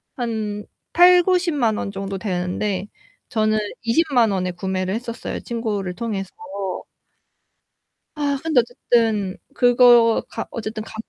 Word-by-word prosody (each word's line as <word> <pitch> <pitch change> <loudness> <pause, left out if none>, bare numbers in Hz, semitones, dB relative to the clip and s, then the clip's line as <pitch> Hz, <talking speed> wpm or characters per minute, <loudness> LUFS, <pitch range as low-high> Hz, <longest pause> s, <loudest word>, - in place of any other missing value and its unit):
한 220 -4 -3 0.3
800,000-900,000 350 - +4
원 200 - -3
정도 195 0 -5
되는데 185 +1 -2 0.4
저는 215 -1 +1 0.2
200,000 240 -2 +2
원에 185 -2 -1
구매를 185 +1 -3
했었어요, 235 0 -5
친구를 210 -6 -3
통해서. 205 -4 -4 1.8
아, 285 -2 -1
근데 315 -5 +3
어쨌든 225 -5 0 0.2
그거 245 -2 +5
가 - - -5
어쨌든 220 -1 -5
가 220 - -12
225 Hz, 200 characters per minute, -21 LUFS, 195-245 Hz, 1.8 s, 그거